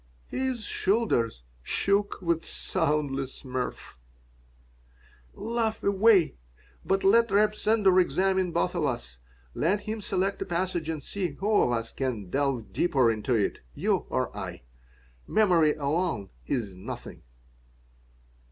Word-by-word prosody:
His 260 -3 -2
shoulders 190 - 0 0.2
shook 200 - 0
with 170 -1 +1
soundless 145 -6 -2
mirth 125 - -5 1.4
"Laugh 225 0 -2
away. 200 - +4 0.5
But 195 0 0
let 230 +4 +5
Reb 210 +2 +3
Sender 210 -4 +3
examine 185 +2 +2
both 90 - 0
of - - -1
us. 60 0 -3 0.3
Let 195 +7 +1
him 215 +1 -4
select 195 -1 -1
a - - -1
passage 175 -2 -2
and 155 -3 -3
see 185 -6 -3
who 200 +9 -2
of - - +2
us 115 -1 -2
can 115 -9 -3
delve 135 -5 -1
deeper 130 -9 +3
into 110 +3 -1
it, 105 -3 0 0.2
you - - 0
or - - -1
I? - - -6 0.6
Memory 175 -8 +4
alone 150 - -1 0.2
is 110 -7 -2
nothing." 90 +1 -8
175 Hz, 125 wpm, -27 LUFS, 130-200 Hz, 1.4 s, let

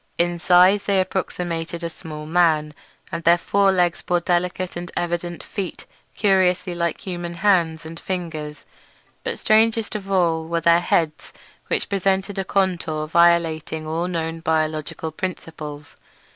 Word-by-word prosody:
In 175 0 0
size 180 +3 +5
they 200 -1 +3
approximated 175 -2 -3
a 170 - -2
small 155 -2 -8
man, 155 -2 +2 0.4
and 170 0 -4
their 170 +1 +6
fore 200 +3 +2
legs 175 -2 +1
bore 175 0 +1
delicate 180 +1 -1
and 175 0 -6
evidently 175 0 -3
flexible - - -23
feet 195 -4 -4 0.3
curiously 185 -3 +2
like 170 -2 -2
human 175 -2 -5
hands 170 -4 +2
and 165 +1 -8
fingers. 160 -5 -5 0.6
But - - -3
strangest 220 0 +2
of 195 -2 -5
all 165 -4 +2
were 170 0 -1
their 170 +1 +5
heads, 160 -4 0 0.4
which - - -1
presented 195 0 0
a - - 0
contour 175 -6 0
violating 165 -1 +2
all 165 +3 -2
known 165 -2 -3
biological 155 0 -1
principles. 155 -4 -6
170 Hz, 145 wpm, -22 LUFS, 160-185 Hz, 0.6 s, their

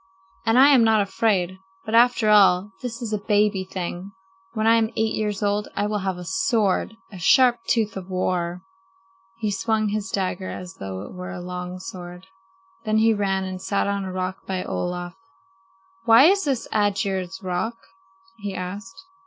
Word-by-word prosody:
And 225 +2 +4
I 270 +2 +8
am 265 -5 +6
not 220 -1 +4
afraid. 190 -3 0 0.3
But 220 - -5
after 235 -2 +4
all, 195 -1 +5
this 240 -1 -5
is 220 -2 -4
a 210 - 0
baby 205 -2 +1
thing! 185 +1 -6 0.4
When 220 -1 -1
I 225 +1 +6
am 225 -1 +1
eight 220 0 0
years 210 -1 -2
old 205 +1 0
I 205 - 0
will 210 0 -1
have 190 -2 -2
a 180 - -8
sword, 205 +4 0 0.2
a 190 - -9
sharp 245 +7 +5
tooth 220 -3 +1
of 190 -1 -7
war." 180 -1 -2 0.7
He 215 -2 -2
swung 215 +1 0
his 205 -1 -3
dagger 185 -1 -2
as 180 0 -8
though 95 0 -5
it - - -10
were 180 0 -7
a 190 -1 -6
long 180 0 -6
sword. 180 -1 -9 0.6
Then 215 -1 +1
he 225 +1 +4
ran 195 -2 0
and 185 -1 -5
sat 195 +1 0
on 200 0 -1
a 190 - -5
rock 185 0 -3
by 185 -1 -2
Olaf. 175 0 -4 0.9
"Why 230 +2 +7
is 390 +4 +4
this 270 -5 -1
Aegir's 195 -3 -1
Rock?" 185 +6 -2 0.6
he 200 -2 -5
asked. 200 - -6
200 Hz, 180 wpm, -23 LUFS, 185-220 Hz, 0.9 s, I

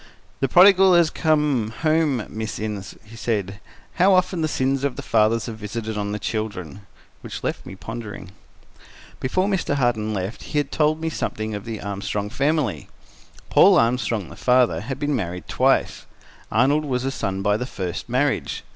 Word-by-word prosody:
"The 135 - +1
prodigal 190 +1 +7
has 170 -2 +4
come 150 -8 +1
home, 155 -6 +2
Miss 110 0 -5
Innes," 105 -2 -5
he 110 +1 -14
said. 100 -3 -2 0.4
"How 190 +2 +5
often 185 -1 +1
the 155 - +1
sins 135 -2 0
of 140 -3 -1
the - - -7
fathers 110 +1 +2
are - - -4
visited 110 +1 -5
on 105 0 -2
the 105 - -2
children!" 100 -3 -5 0.3
Which - - -7
left - - -3
me 95 - -8
pondering. 105 -3 -8 0.9
Before 185 +9 0
Mr. 190 -7 0
Harton 120 -5 0
left, 100 +1 -4
he 145 -1 -1
told 155 +2 0
me 160 0 -2
something 110 -7 -3
of 105 +1 -6
the 115 -2 -5
Armstrong 100 0 -3
family. 145 -5 0 0.6
Paul - - +7
Armstrong, 115 -4 +1
the - - -11
father, 125 -1 +2
had 130 +5 -5
been 145 0 -1
married 90 -6 -4
twice. - - +1 0.4
Arnold 135 +7 +3
was 130 -2 -1
a 135 - 0
son 95 -6 -3
by 105 0 +2
the 125 +4 -3
first 95 -2 -5
marriage. 130 +3 0
115 Hz, 170 wpm, -23 LUFS, 105-145 Hz, 0.9 s, prodigal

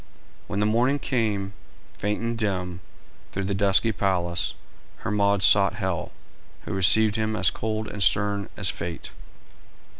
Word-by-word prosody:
When 100 - -3
the 105 - +2
morning 120 +6 +2
came, 105 -8 -2 0.4
faint 105 +1 -2
and 115 0 -2
dim, 90 -5 -2 0.5
through 100 - -3
the 100 +1 -2
dusky 100 +3 +3
palace, 90 -4 -1 0.5
Hermod 100 -2 +1
sought 100 +1 +5
Hel, 95 -5 -3 0.5
who - - -6
received 105 +3 +5
him 110 0 -1
as 110 - +4
cold 110 0 -4
and 100 - -7
stern 100 0 +1
as 100 -3 +2
fate. 85 -1 -7
100 Hz, 140 wpm, -24 LUFS, 95-110 Hz, 0.5 s, sought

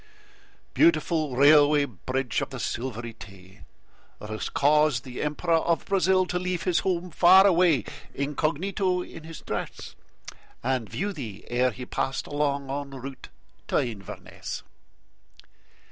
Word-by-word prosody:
Beautiful 155 -3 +2
Railway 145 +1 +6
Bridge 130 +3 -3
of - - -3
the - - -7
Silvery 120 -1 -4
Tay! 100 -2 -14 0.5
That 105 - -9
has 110 - -3
caused 150 -3 +3
the 125 -1 -7
Emperor 165 +3 +1
of 165 0 0
Brazil 190 -1 +3
to 180 0 -2
leave 180 0 -2
His 180 -2 +2
home 180 -1 -2
far 185 +5 +7
away, 170 - +4 0.3
incognito 180 +6 -1
in 160 - -11
his 165 -1 -9
dress, - - -5 0.7
And 125 -3 -1
view 200 +2 -3
thee 115 - -7
ere 125 +1 +2
he 125 +1 -8
passed 135 - -2
along 140 -1 -1
en 140 -1 -5
route 135 +1 -9 0.4
to - - +1
Inverness. 105 -6 -5
145 Hz, 130 wpm, -26 LUFS, 125-170 Hz, 0.7 s, far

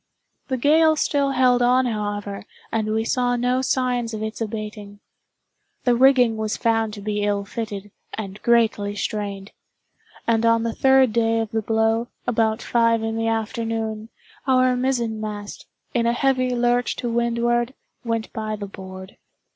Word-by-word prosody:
The 260 - -1
gale 315 +4 +4
still 285 -2 +1
held 250 -1 +3
on, 250 +1 +4
however, 205 -3 -3 0.3
and 220 -1 -1
we 220 +1 +1
saw 245 0 +1
no 250 +1 +1
signs 250 -3 0
of 215 - -4
its 220 +1 -5
abating. 210 -2 -6 0.8
The 245 -1 +3
rigging 250 -3 +5
was 215 -1 -2
found 225 -1 +1
to 205 - -9
be 210 0 -2
ill 205 -1 0
fitted, 205 -2 -6 0.2
and 200 -2 -7
greatly 220 -4 +2
strained; 200 -1 -4 0.7
and 230 -1 +2
on 230 0 +3
the 230 -1 -1
third 265 -3 +4
day 225 0 +2
of 225 -1 -3
the 225 -1 0
blow, 225 +2 +1 0.2
about 225 -2 +1
five 230 -1 +2
in 225 0 -2
the 225 0 -1
afternoon, 225 0 -2 0.4
our 255 -1 +4
mizzen 240 -4 -1
mast, 205 -1 -6 0.3
in 235 -3 +1
a 235 - +2
heavy 255 0 +1
lurch 245 0 +1
to 245 - -4
windward, 235 +1 0 0.3
went 230 -2 -3
by 215 -1 -3
the 205 -1 -6
board. 190 -1 -10
225 Hz, 155 wpm, -22 LUFS, 215-245 Hz, 0.8 s, rigging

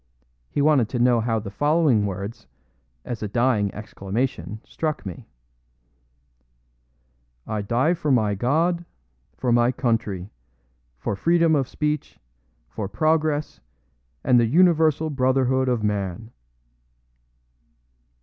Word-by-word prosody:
He 140 - 0
wanted 140 -7 +3
to 125 - -3
know 120 0 +3
how 115 0 0
the 100 -2 -5
following 145 -4 +2
words, 100 - -6 0.6
as 120 - -5
a 105 - -2
dying 110 -2 +1
exclamation, 105 -1 -4
struck 155 -6 -3
me: 90 -3 -8 2.2
"I 105 -1 -3
die 120 - +1
for 160 -3 -3
my 110 -6 +3
God, 160 - +1 0.5
for 125 - 0
my 120 +1 +4
country, 115 -7 -2 0.7
for 100 - -3
freedom 165 - +3
of 135 -3 0
speech, 150 +1 -3 0.5
for 100 - -5
progress, 155 +1 0 0.6
and 125 -1 +4
the 115 - +3
universal 160 0 +3
brotherhood 130 -1 +1
of 120 -3 0
man!" 105 +1 -2
125 Hz, 110 wpm, -23 LUFS, 105-150 Hz, 2.2 s, my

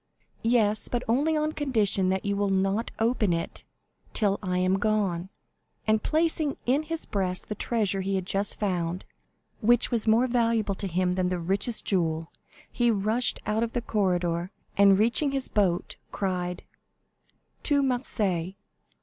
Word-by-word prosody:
"Yes; 220 -3 +2
but 245 0 -2
only 290 +7 +2
on 305 0 0
condition 215 -11 +1
that 190 +1 -1
you 200 0 0
will 200 0 0
not 195 +3 0
open 225 -5 +1
it 165 0 -4 0.5
till 200 -3 +1
I 180 -2 -1
am 185 +1 +2
gone;" 195 -4 0 0.6
and 215 0 +2
placing 315 -2 0
in 265 +4 +2
his 325 +1 -4
breast 185 -3 -3
the - - -1
treasure 210 -3 0
he 195 +1 -1
had 190 -2 -2
just 200 +2 0
found, 180 -3 -2 0.5
which 240 +2 +3
was 230 -2 +1
more 225 +3 +4
valuable 230 -4 +1
to 195 +1 -4
him 180 +1 0
than 180 -1 0
the 180 - -1
richest 195 +7 0
jewel, 165 -4 0 0.4
he 240 -1 +1
rushed 220 +3 +1
out 215 +1 0
of 230 0 -2
the 240 - -1
corridor, 180 -5 0 0.3
and 200 -1 +6
reaching 240 +7 +3
his 270 -1 -2
boat, 185 -4 0
cried, 180 -2 -3 1.0
"To 285 -2 +2
Marseilles!" 200 -9 -1
205 Hz, 155 wpm, -27 LUFS, 185-235 Hz, 1.0 s, and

